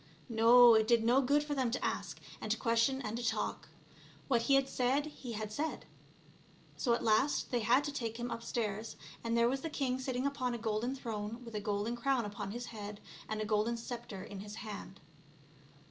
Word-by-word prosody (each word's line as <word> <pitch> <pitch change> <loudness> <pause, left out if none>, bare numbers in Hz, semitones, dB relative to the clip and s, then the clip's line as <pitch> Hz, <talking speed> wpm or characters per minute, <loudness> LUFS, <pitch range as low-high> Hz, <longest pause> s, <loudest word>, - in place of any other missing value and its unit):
No, 235 +1 +8
it 220 -1 +4
did 235 -1 +4
no 245 +4 +4
good 285 +3 +3
for 295 0 -3
them 260 -4 +1
to 235 - -2
ask - - -3 0.2
and 215 - -3
to 225 - +2
question 230 +4 +2
and 215 0 -3
to 240 - -4
talk; 235 - -2 0.6
what 240 -4 +3
he 275 +4 +4
had 275 0 +3
said 260 +4 +1
he 265 -5 -7
had 215 -1 -4
said. 305 +8 -3 0.9
So 235 -3 +2
at - - -4
last 225 +7 +2
they 245 - +2
had 240 +5 +4
to 290 - -3
take 230 -5 -4
him 240 0 -4
up 230 - -4
stairs, 220 -2 -3 0.3
and 230 0 0
there 235 0 +5
was 265 +2 0
the 325 - -3
king 260 -4 -1
sitting 260 0 -2
upon 255 -3 -1
a - - -3
golden 225 +3 -1
throne 230 -1 -5
with 230 - -9
a 210 - -1
golden 205 +3 -1
crown 245 -1 +1
upon 205 -1 -5
his 240 +4 -5
head 210 -3 -7 0.3
and 215 0 -2
a - - -1
golden 215 +2 +1
sceptre 230 -4 -6
in 200 -1 -8
his 205 +1 -8
hand. 200 -2 -7
235 Hz, 210 wpm, -33 LUFS, 215-255 Hz, 0.9 s, No